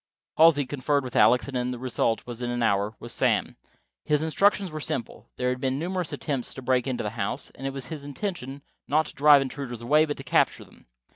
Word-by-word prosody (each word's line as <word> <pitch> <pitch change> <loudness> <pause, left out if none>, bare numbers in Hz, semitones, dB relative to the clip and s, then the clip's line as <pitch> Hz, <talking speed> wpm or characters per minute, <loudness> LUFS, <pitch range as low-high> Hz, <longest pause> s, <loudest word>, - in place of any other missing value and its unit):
Halsey 155 -3 +6
conferred 140 +1 0
with 125 - -7
Alex, 120 +5 +5
and 125 -2 -2
the 125 - -4
result, 120 -2 -1 0.2
in 120 - -2
an 120 0 -1
hour, 100 0 +1
was 120 - -5
Sam. - - +1 0.5
His 150 0 +1
instructions 195 +3 +2
were 155 - -5
simple. 120 -5 -4
There 125 0 -1
had 125 0 -3
been 130 0 0
numerous 180 +1 -3
attempts 135 -5 -3
to 130 - -8
break 130 0 +1
into 130 -2 -2
the 105 - -3
house; 105 -3 -4
it 135 +1 -5
was 135 0 -6
the 155 -3 -6
intention, 140 -3 -5 0.2
not 155 +2 +2
to - - -9
drive 145 -1 +6
intruders 130 -4 -6
away, 150 +6 +4
but 145 -1 -4
to 135 - -8
capture - - +1
them. - - -21
135 Hz, 210 wpm, -26 LUFS, 125-150 Hz, 0.5 s, Halsey